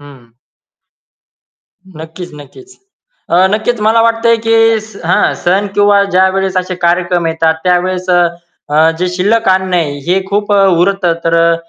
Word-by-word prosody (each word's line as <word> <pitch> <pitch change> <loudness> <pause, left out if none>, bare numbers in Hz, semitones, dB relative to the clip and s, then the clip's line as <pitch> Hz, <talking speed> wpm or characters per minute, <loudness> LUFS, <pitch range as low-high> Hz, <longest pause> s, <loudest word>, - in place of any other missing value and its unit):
हं. 135 -5 -16 1.7
नक्कीच, 165 +3 -9
नक्कीच. 150 - -15 0.5
अ, 180 +2 +4
नक्कीच 220 +2 -1
मला 225 +1 +3
वाटतंय 230 0 +2
की 225 - +3 0.2
स 215 -1 -14
हां, 175 - +1
सण 190 +4 +1
किंवा 205 0 +3
ज्यावेळेस 190 0 0
असे 185 0 -2
कार्यक्रम 175 0 0
येतात 160 0 0
त्यावेळेस 180 0 -1
अ, 175 - +3 0.5
अ, 155 +2 +3
जे 180 +1 -1
शिल्लक 200 +5 0
अन्न 185 -1 +1
आहे. 145 -5 -1
हे 185 +2 +1
खूप 205 +1 -1
अ, 200 -1 +4 0.2
उरतं. 190 -1 +1
तर 165 0 +1
अ, 170 0 +3
185 Hz, 150 wpm, -12 LUFS, 170-205 Hz, 1.7 s, अ